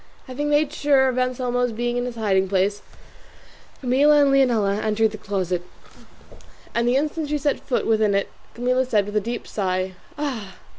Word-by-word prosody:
Having 285 +3 -3
made 295 0 +2
sure 275 -3 +3
of 255 0 -1
Anselmo's 245 -1 0
being 240 +2 -2
in 245 0 -1
his 245 -1 -5
hiding 190 -4 +1
place, 200 +2 +1 1.0
Camilla 285 +4 +4
and 280 - +3
Leonela 225 -7 +2
entered 220 0 +1
the 215 - -8
closet, 185 -3 -2 1.1
and 235 0 +1
the 245 - +3
instant 300 +2 -1
she 300 - 0
set 290 0 0
foot 255 - -2
within 215 -2 +2
it 200 - -1 0.2
Camilla 250 +2 +1
said, 215 -6 +1
with 205 +1 -7
a 210 - +3
deep 235 +3 -5
sigh, 185 -2 -2 0.2
"Ah! 240 -10 -4
240 Hz, 170 wpm, -23 LUFS, 205-265 Hz, 1.1 s, Camilla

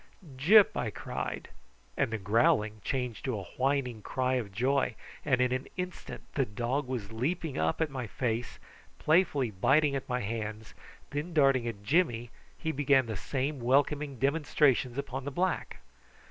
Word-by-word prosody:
"Gyp!" 195 +10 +6
I 115 - -1
cried; - - -5 0.5
and - - +1
the 110 - -1
growling 105 +1 +2
changed 125 -4 -3
to 130 -5 -1
a - - -6
whining 130 -4 0
cry 130 +4 -1
of 120 -6 -2
joy, 130 +3 +1 0.3
and 130 -4 +2
in 125 0 +2
an 130 +1 -2
instant 180 0 -6
the 140 - +2
dog 120 +5 -2
was 120 -6 -4
leaping 145 +6 -2
up 80 - 0
at 160 -3 0
my 130 -4 -4
face, 120 0 -2 0.4
playfully 150 - +2
biting 140 +9 +3
at 135 - -4
my 125 0 0
hands, 110 0 -5 0.4
and 145 - -1
then 175 - -10
darting 135 -5 +4
at 105 -3 -5
Jimmy 120 - +1 0.3
he 160 - -2
began 135 -2 +3
the 110 -2 -4
same 135 +7 -2
welcoming 140 +3 +1
demonstrations 140 -2 +2
upon 135 -1 -4
the 140 - -3
black. 180 +6 -2
130 Hz, 160 wpm, -30 LUFS, 115-145 Hz, 0.5 s, Gyp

